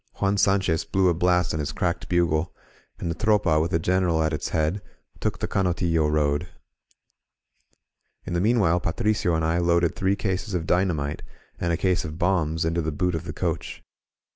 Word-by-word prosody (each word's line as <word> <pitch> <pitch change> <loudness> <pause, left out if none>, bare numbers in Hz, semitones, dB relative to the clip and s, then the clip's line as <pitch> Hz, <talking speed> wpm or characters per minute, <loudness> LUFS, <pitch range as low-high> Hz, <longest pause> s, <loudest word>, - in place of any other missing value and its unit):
Juan 100 0 0
Sanchez 95 -5 +2
blew 95 -1 +2
a - - +3
blast 90 +1 +1
on 80 - -2
his 75 -1 -2
cracked 90 -2 -2
bugle, 85 -1 +1 0.4
and 85 - -3
the - - -1
Tropa, 105 -4 +2
with 80 - 0
the 80 - +1
Gkneral 90 -2 +1
at 80 - -1
its 75 - -3
head, 80 +5 0 0.4
took - - -2
the - - -3
Canotillo 85 -4 +1
road. 75 +2 +1 1.8
In - - -4
the 85 - +1
meanwhile 100 -6 +3
Patricio 90 +1 0
and 80 0 0
I 80 +2 +1
loaded 85 -1 +2
three 95 +1 +1
cases 100 0 -2
of 85 -2 -2
dynamite 85 -6 0 0.4
and 85 - 0
a 85 - +1
case 95 0 +1
of 80 0 -6
bombs 80 -3 0
into 85 +1 0
the 80 0 -2
boot 90 +4 -1
of 80 - -4
the - - -5
coach. - - -3
85 Hz, 185 wpm, -25 LUFS, 80-95 Hz, 1.8 s, a